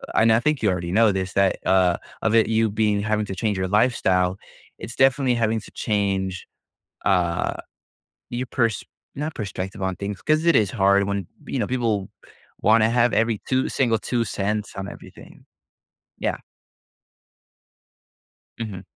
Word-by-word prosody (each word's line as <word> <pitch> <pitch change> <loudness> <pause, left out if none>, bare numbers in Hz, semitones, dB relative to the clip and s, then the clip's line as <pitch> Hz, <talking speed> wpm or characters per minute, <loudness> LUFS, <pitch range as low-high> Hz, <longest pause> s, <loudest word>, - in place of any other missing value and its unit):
a - - 0
and 110 0 +5
I 115 - +4
think 150 0 0
you 105 - +3
already 85 -1 -2
know 110 +1 +4
this, 95 0 -3
that, 100 -1 +2
uh, 90 -2 +3 0.3
of 110 0 +2
it 110 - +5
you 110 0 +2
being 105 -1 +1
having 105 0 0
to 95 - -5
change 105 0 -1
your 95 0 -1
lifestyle, 95 -4 +2 0.4
it's 115 - -8
definitely 135 -1 +3
having 110 -1 0
to - - -14
change, 95 -3 -2 0.6
uh, 90 -3 +1 0.8
your 125 +1 -3
pers 115 -6 0 0.3
not 150 +2 -4
perspective 95 -1 -5
on 95 -1 -1
things, 100 +1 -5
'cause 155 +2 +1
it 170 - +5
is 105 -3 +3
hard 100 -2 +3
when, 100 -3 -3 0.2
you 135 - -2
know, 105 - 0
people 115 -6 -1 0.5
wanna 110 0 +4
have 120 0 +2
every 110 -1 +1
2 130 0 +1
single 115 -5 +1
2¢ 105 -3 -2
on 95 +1 -5
everything. - - -14 0.7
Yeah. - - -1 2.2
Mhm. 100 -4 -5
105 Hz, 155 wpm, -23 LUFS, 95-115 Hz, 2.2 s, and